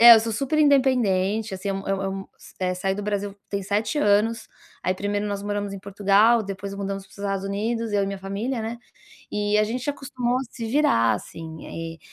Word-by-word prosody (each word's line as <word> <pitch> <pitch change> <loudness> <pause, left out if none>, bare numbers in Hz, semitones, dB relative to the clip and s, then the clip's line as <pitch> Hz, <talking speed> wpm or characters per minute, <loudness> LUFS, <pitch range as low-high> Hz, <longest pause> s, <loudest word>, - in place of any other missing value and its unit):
é 235 0 +12
eu 220 - +6
sou 225 0 -2
super 275 +6 0
independente, 225 -8 +3
assim, 190 +2 -5
é - - +1
um 195 - -5
é 195 - +2
um 195 - -3
é 195 - -1
um 195 0 -4 0.4
eh, 185 0 +1
saí 190 +1 -1
do 205 - -4
Brasil 205 -1 -2
tem 200 -1 -2
7 215 +7 0
anos, 220 0 +3 0.3
aí 185 - 0
1º 205 +2 -1
nós 200 -1 -3
moramos 205 -1 -2
em 200 - -5
Portugal, 205 +4 +4
depois 200 -1 -5
mudamos 195 0 -3
para 195 - -23
os - - -17
Estados 195 -1 -2
Unidos, 220 +3 -1
eu 200 -1 +3
e - - -3
minha 195 -1 -4
família, 215 +6 -3
né, 230 +2 -4 0.5
e 210 0 +1
a 215 - +4
gente 250 +6 -2
acostumou 255 -3 -1
a - - -2
se 230 -3 -5
virar, 220 - +4
assim. 160 -1 -8
Eh, 165 0 -6
205 Hz, 225 wpm, -25 LUFS, 195-230 Hz, 0.5 s, é